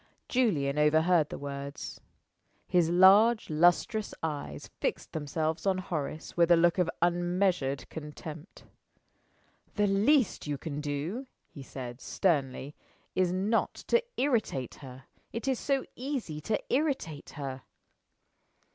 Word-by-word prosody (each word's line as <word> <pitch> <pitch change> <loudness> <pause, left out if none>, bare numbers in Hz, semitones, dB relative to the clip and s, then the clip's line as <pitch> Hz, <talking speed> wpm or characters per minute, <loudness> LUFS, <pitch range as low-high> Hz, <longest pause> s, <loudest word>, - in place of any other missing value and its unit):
Julian 150 - +1
overheard 155 +1 +4
the - - -5
words. 140 0 -6 0.7
His 175 -3 +3
large 195 +5 +6
lustrous 175 +7 +2
eyes 145 - -4
fixed - - -2
themselves 160 +3 -2
on 190 -1 +3
Horace 155 -4 -4
with 170 -1 +4
a 175 - +8
look 175 +2 +3
of 175 -2 +2
unmeasured 175 -5 +1
contempt. 150 +2 -9 1.1
"The 210 - +3
least 210 - +2
you 145 -1 -1
can 145 +1 -5
do," 155 - -3 0.2
he 140 - -10
said, 125 -2 -8
sternly, 140 -5 0 0.4
"is 185 -1 +2
not 200 +5 +1
to 475 - +5 0.2
irritate 220 - 0
her. 130 -1 -10 0.3
It 230 +4 -5
is 265 -3 +1
so 275 -2 0
easy 250 - -4
to 215 - +1 0.2
irritate 265 - -1
her!" 135 -2 -5
170 Hz, 120 wpm, -30 LUFS, 145-200 Hz, 1.1 s, a